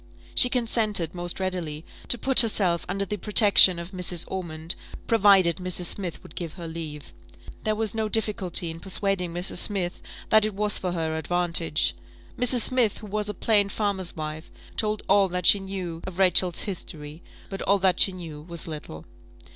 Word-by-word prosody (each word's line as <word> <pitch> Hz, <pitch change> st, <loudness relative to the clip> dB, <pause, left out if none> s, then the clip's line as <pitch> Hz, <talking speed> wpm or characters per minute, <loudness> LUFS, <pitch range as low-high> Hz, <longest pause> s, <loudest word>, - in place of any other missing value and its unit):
She 250 Hz, -, +5 dB
consented, 220 Hz, -, 0 dB
most 175 Hz, 0 st, -4 dB
readily, 175 Hz, -5 st, -4 dB, 0.2 s
to 240 Hz, -, +1 dB
put 265 Hz, +3 st, +2 dB
herself 195 Hz, -7 st, +3 dB
under 195 Hz, +2 st, -2 dB
the 210 Hz, -, -4 dB
protection 200 Hz, -3 st, +6 dB
of 170 Hz, +2 st, -7 dB
Mrs. 180 Hz, -2 st, +1 dB
Ormond, 170 Hz, -2 st, -4 dB, 0.3 s
"provided 195 Hz, -6 st, +4 dB
Mrs. 180 Hz, -1 st, -2 dB
Smith 180 Hz, -1 st, -3 dB
would -, -, -14 dB
give 165 Hz, -3 st, -6 dB
her 170 Hz, -3 st, -8 dB
leave." 155 Hz, -3 st, -8 dB, 0.5 s
There 215 Hz, 0 st, 0 dB
was 220 Hz, -1 st, -2 dB
no 220 Hz, -1 st, -2 dB
difficulty 195 Hz, -6 st, +1 dB
in 165 Hz, -, -10 dB
persuading 190 Hz, -1 st, -1 dB
Mrs. 175 Hz, +2 st, -1 dB
Smith 185 Hz, -2 st, +1 dB, 0.3 s
that 220 Hz, -1 st, +4 dB
it 215 Hz, -2 st, -2 dB
was 210 Hz, 0 st, -1 dB
for 180 Hz, -2 st, -3 dB
her 160 Hz, -2 st, -2 dB
advantage. 165 Hz, -1 st, 0 dB, 0.4 s
Mrs. 250 Hz, 0 st, +3 dB
Smith, 245 Hz, -3 st, +3 dB
who -, -, -11 dB
was 210 Hz, 0 st, -3 dB
a 210 Hz, -, -5 dB
plain 205 Hz, 0 st, +1 dB
farmer's 200 Hz, -4 st, -2 dB
wife, 155 Hz, 0 st, -7 dB, 0.3 s
told 215 Hz, -1 st, -1 dB
all 200 Hz, 0 st, +4 dB
that 180 Hz, 0 st, -3 dB
she 200 Hz, -, +7 dB
knew 185 Hz, -4 st, -6 dB
of 185 Hz, -2 st, -8 dB
Rachel's 185 Hz, -2 st, +3 dB
history; 160 Hz, -5 st, -7 dB, 0.3 s
but 195 Hz, -, -6 dB
all 200 Hz, -, +2 dB
that 185 Hz, -2 st, +1 dB
she 195 Hz, -, +5 dB
knew 165 Hz, -5 st, -9 dB
was 170 Hz, +1 st, -5 dB
little. 150 Hz, -, -9 dB
185 Hz, 175 wpm, -25 LUFS, 170-205 Hz, 0.5 s, she